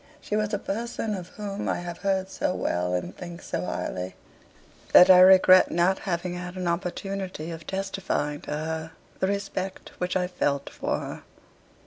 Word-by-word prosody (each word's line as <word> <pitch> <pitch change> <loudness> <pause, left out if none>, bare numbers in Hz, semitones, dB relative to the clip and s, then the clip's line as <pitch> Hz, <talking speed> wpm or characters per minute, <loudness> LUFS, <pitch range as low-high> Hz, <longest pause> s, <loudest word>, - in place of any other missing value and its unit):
She 210 - -3
was 210 -1 0
a 205 - +1
person 225 +2 -3
of 180 -3 -5
whom 200 +1 -5
I - - +1
have 175 -1 -6
heard 190 -1 0
so 180 - -1
well 90 +1 0
and 90 +1 -4
think 175 -1 -8
so - - -3
highly, 90 0 -4 0.8
that 180 +1 +10
I 180 - +9
regret 185 0 +8
not 175 +3 +2
having 175 0 -1
had 180 0 -6
an 185 -1 -3
opportunity 180 -1 -3
of 165 -1 -9
testifying 190 -6 -2
to - - -11
her 160 +1 -3 0.3
the 190 - +1
respect 195 -1 -3
which 180 +1 0
I 180 - +1
felt 145 -6 -1
for - - -2
her.' - - -6
180 Hz, 170 wpm, -26 LUFS, 170-195 Hz, 0.8 s, that